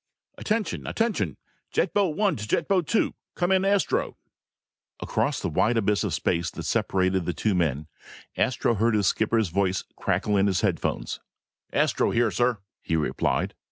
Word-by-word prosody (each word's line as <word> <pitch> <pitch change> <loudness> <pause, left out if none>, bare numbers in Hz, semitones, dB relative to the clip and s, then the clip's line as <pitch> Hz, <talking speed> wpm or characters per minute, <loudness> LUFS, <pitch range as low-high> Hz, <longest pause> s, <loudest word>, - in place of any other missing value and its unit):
"Attention! 220 0 -2
Attention! 225 -1 -1 0.3
Jet - - 0
boat 195 -7 +1
one 200 -5 +2
to 105 0 -6
jet 160 - 0
boat 185 -5 +2
two! 230 - +1 0.2
Come 175 +1 0
in, 190 0 +3
Astro!" 200 0 +1 0.8
Across - - -1
the - - -1
wide 115 +2 +2
abyss 105 -1 +1
of - - -1
space 85 -1 0
that - - -7
separated 95 -1 +1
the 90 - 0
two 105 +7 0
men, 75 -5 0 0.5
Astro 120 -1 +1
heard 115 +1 +2
his 105 -2 +2
skipper's 110 0 +1
voice 95 +1 0
crackle 105 -1 0
in 100 +1 +3
his 95 -3 +1
headphones. - - -1 0.5
"Astro - - +2
here, 115 -2 +2
sir," 120 +4 +1 0.2
he 80 - -1
replied. 80 -2 0
110 Hz, 160 wpm, -26 LUFS, -, 0.8 s, in